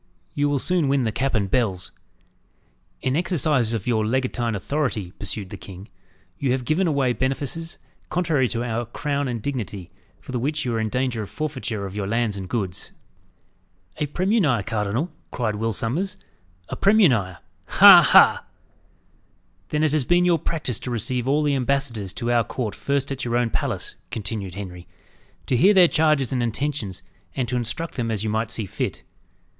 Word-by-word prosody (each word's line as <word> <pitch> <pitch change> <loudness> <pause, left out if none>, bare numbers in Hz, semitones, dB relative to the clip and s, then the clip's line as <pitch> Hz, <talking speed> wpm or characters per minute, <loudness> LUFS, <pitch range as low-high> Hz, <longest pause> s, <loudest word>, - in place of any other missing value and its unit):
"You 145 0 +1
will 145 - +1
soon 175 +2 +1
win 135 -1 +2
the 110 - 0
cap 135 +3 -1
and 100 -3 +1
bells." 95 -5 -1 1.1
"In 130 +1 +1
exercise 155 -8 +1
of 115 -4 -3
your 115 -3 +1
legatine 120 -1 -1
authority," 110 -5 -2
pursued 100 0 -5
the - - -6
king, 95 +1 -11 0.5
"you 135 -3 +1
have 130 -1 -2
given 170 +7 +1
away 140 -5 +1
benefices 145 +6 -2 0.3
contrary 160 -7 +1
to 115 0 -2
our 120 -1 -2
crown 145 +3 -2
and 120 -4 -4
dignity, 105 -9 -4 0.3
for - - -10
the 125 - -1
which 150 +3 -1
you 120 - -1
are 115 - 0
in 110 -1 -1
danger 125 -1 -1
of 105 - -6
forfeiture 130 -9 -3
of 95 0 -7
your 100 -2 -2
lands 115 -1 0
and 95 -2 -6
goods." 95 -7 -4 1.0
"A 150 - -1
premunire, 175 - +1
cardinal," 110 - -1 0.2
cried 110 -4 -2
Will 115 +1 -1
Sommers. 165 - -2 0.5
"A - - -3
premunire! 130 - +3 0.3
ha! - - +9
ha!" - - +6 1.2
"Then 150 0 0
it 155 - +2
has 150 -4 +1
been 175 +3 +3
your 170 -2 +3
practice 145 -8 -3
to - - -5
receive 125 +1 -2
all 150 +2 +2
the 145 -1 +2
ambassadors 130 -7 0
to 120 +1 -2
our 120 -1 +3
court 110 -1 -4
first 140 +5 -1
at 135 0 -3
your 120 0 0
own 120 -2 0
palace," - - -2 0.2
continued 100 -4 -4
Henry, 90 -3 -8 0.6
"to 130 - 0
hear 195 - +5
their 180 -2 +8
charges 150 -6 +2
and 125 - 0
intentions, 120 -4 -2 0.3
and 130 -3 -1
to 125 - -2
instruct 140 +8 -3
them 115 -2 -1
as 110 -2 -1
you 110 - -1
might 110 +1 -1
see 110 -1 -2
fit. - - -4
125 Hz, 180 wpm, -23 LUFS, 110-145 Hz, 1.2 s, ha